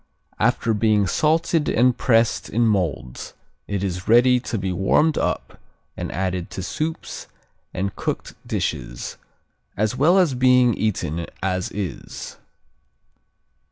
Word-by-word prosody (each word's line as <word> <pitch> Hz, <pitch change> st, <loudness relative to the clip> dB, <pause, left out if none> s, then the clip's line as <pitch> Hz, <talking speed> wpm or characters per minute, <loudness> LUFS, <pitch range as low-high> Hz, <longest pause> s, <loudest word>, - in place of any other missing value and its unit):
After 115 Hz, -, +2 dB
being 105 Hz, -1 st, +3 dB
salted 160 Hz, -, +1 dB
and 125 Hz, +1 st, +3 dB
pressed 115 Hz, -2 st, +2 dB
in 120 Hz, +2 st, +2 dB
molds 85 Hz, -, -2 dB, 0.3 s
it 100 Hz, -1 st, -2 dB
is 90 Hz, -2 st, -3 dB
ready 125 Hz, +2 st, +5 dB
to 120 Hz, -2 st, -4 dB
be 95 Hz, -2 st, -2 dB
warmed 115 Hz, -, +2 dB
up -, -, -2 dB, 0.3 s
and -, -, -5 dB
added 90 Hz, -1 st, -2 dB
to 95 Hz, -, -3 dB
soups 155 Hz, -, -4 dB, 0.4 s
and 95 Hz, +1 st, -3 dB
cooked -, -, -4 dB
dishes, -, -, -3 dB, 0.6 s
as 110 Hz, +3 st, 0 dB
well 160 Hz, +8 st, +4 dB
as 175 Hz, -7 st, +4 dB
being 125 Hz, -1 st, +4 dB
eaten 85 Hz, -7 st, -2 dB, 0.2 s
as 95 Hz, -1 st, -1 dB
is. 95 Hz, -6 st, -6 dB
110 Hz, 125 wpm, -22 LUFS, 95-125 Hz, 0.6 s, ready